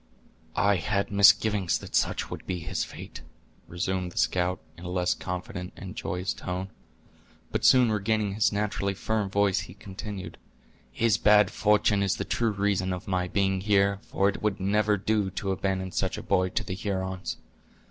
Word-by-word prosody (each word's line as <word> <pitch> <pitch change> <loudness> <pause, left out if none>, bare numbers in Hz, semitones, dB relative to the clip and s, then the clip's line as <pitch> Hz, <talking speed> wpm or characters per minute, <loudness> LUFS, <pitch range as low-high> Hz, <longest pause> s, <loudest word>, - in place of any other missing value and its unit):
"I 100 -1 +3
had 100 +2 -1
misgivings 100 -1 +5
that - - -8
such - - 0
would - - -7
be 90 - -1
his - - -2
fate," - - -9 0.5
resumed 90 +1 -2
the - - -15
scout, 90 0 +1 0.2
in 85 - -13
a 90 - -5
less 90 0 +1
confident 90 0 -6
and - - -8
joyous 90 +2 -2
tone. 90 +1 -5 0.8
But - - -2
soon 125 -3 +6
regaining 105 -1 0
his 105 +2 +2
naturally 100 -1 -1
firm 105 0 -1
voice, 100 -1 +2
he 85 +3 -8
continued: 100 -1 -8 0.5
"His 115 -2 +2
bad 105 -2 +5
fortune 105 0 +3
is 100 -1 +1
the - - -4
true 115 -1 0
reason 100 -2 0
of 90 - -7
my 90 -1 0
being 95 0 0
here, 100 -1 +2
for 100 - 0
it 100 - -1
would 105 -2 0
never 105 +2 +2
do 105 0 0
to 95 +1 -3
abandon 95 -1 -2
such - - -1
a - - -6
boy 95 0 +2
to 110 - -2
the 100 - -5
Hurons. 95 -1 -3
100 Hz, 175 wpm, -27 LUFS, 95-105 Hz, 0.8 s, soon